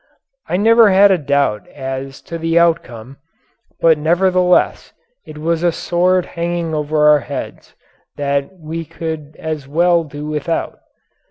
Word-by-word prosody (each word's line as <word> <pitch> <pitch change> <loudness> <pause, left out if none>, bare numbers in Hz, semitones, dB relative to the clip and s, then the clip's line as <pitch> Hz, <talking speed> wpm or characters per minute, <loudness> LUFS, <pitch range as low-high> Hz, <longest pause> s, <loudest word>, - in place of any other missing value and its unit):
I - - 0
never 225 +2 +5
had 195 +1 +5
a 190 - +3
doubt 140 -7 0
as 135 0 -7
to 165 - -7
the 165 +1 0
outcome, 135 -7 0 0.6
but 160 -2 +4
nevertheless 180 +3 +1 0.3
it 155 - -10
was 165 +2 -1
a 175 0 +2
sword 180 +2 +1
hanging 170 -1 -3
over 150 0 +1
our 150 -1 +6
heads 140 -2 -8 0.4
that 140 +1 -1
we 165 0 -6
could 155 -1 -7
as 155 -3 -5
well 170 +3 +2
do 145 -1 -8
without. 155 +2 -3
160 Hz, 140 wpm, -17 LUFS, 145-175 Hz, 0.6 s, our